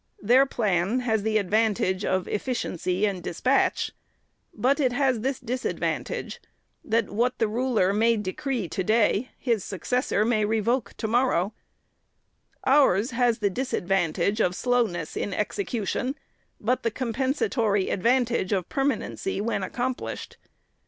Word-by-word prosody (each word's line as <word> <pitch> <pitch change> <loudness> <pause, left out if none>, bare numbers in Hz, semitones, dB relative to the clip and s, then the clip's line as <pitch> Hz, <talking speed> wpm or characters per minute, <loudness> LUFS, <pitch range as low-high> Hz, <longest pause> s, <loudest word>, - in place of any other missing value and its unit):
Their 255 +6 +5
plan 210 0 0
has 220 -3 +1
the 215 +1 +1
advan 215 +2 +2
tage 185 +1 -1
of 185 -1 0
efficiency 200 -5 -1
and 195 -3 -2
despatch, 255 +12 +1 0.6
but 275 +4 +1
it 260 -4 +2
has 260 -2 +2
this 265 +3 -2
disad 250 +1 -3
vantage, - - -3 0.4
that 225 -1 0
what 245 +4 0
the 225 - +2
ruler 220 -4 +1
may 225 +2 +3
decree 220 - -3
to 190 +4 -3
day, 220 +3 +2
his 230 -6 0
successor 215 - 0
may 220 -2 +2
revoke 225 +4 0
to 220 - -2
morrow; 225 -5 +2 1.1
ours 260 -6 +4
has 240 -1 +2
the 205 -4 0
disad 255 +2 -2
vantage 190 +3 +1
of 180 -2 +1
slowness 230 -11 0
in 200 - -2
execution, 250 - -2 0.4
but 245 +4 0
the 230 - +1
compensatory 235 - 0
advantage 240 -1 +1
of 185 -3 -1
permanency, 285 - -1
when 215 -1 -1
accomplished. 245 +6 -4
225 Hz, 135 wpm, -26 LUFS, 200-255 Hz, 1.1 s, Their